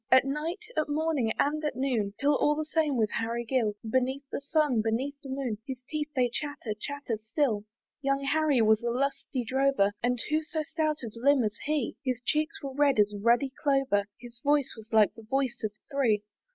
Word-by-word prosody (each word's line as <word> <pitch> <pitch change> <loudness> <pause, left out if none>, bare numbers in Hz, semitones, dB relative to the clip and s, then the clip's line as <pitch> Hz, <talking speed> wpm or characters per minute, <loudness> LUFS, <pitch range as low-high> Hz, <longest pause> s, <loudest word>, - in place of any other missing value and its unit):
At 260 +1 +7
night, 315 +9 -3
at 310 -1 0
morning, 295 -6 +1
and 305 +2 +1
at 300 -4 -1
noon, 235 -6 0
'Tis 280 - -1
all 295 +1 +3
the 310 +1 -2
same 310 -3 +1
with 215 -2 +1
Harry 230 +1 -2
Gill; 225 -4 +1
Beneath 260 +4 0
the - - -3
sun, 285 -5 +2
beneath 230 +6 -1
the 270 - -9
moon, 260 -5 -2
His 260 -2 -6
teeth 305 0 -3
they 250 -2 +3
chatter, 285 -2 -4
chatter 240 0 -4
still. 220 -2 0 0.4
Young 275 0 0
Harry 290 -3 +3
was 220 +1 +4
a 235 - -1
lusty 270 0 -1
drover, 265 -4 +2
And 245 0 +1
who 310 +1 +3
so 315 0 -3
stout 310 -2 -1
of 225 -3 -6
limb 265 +2 +4
as 210 -1 -1
he? 295 -4 -1
His 255 -3 -1
cheeks 310 +5 -1
were 275 -1 -4
red 285 -2 +3
as 210 0 +4
ruddy 235 +6 +2
clover, 270 -8 +2
His 240 -1 -12
voice 290 0 +2
was 220 0 -13
like 215 -2 +5
the 225 - -12
voice 260 +2 -1
of 215 - 0 0.2
three. 235 -7 +2
265 Hz, 200 wpm, -29 LUFS, 230-290 Hz, 0.4 s, At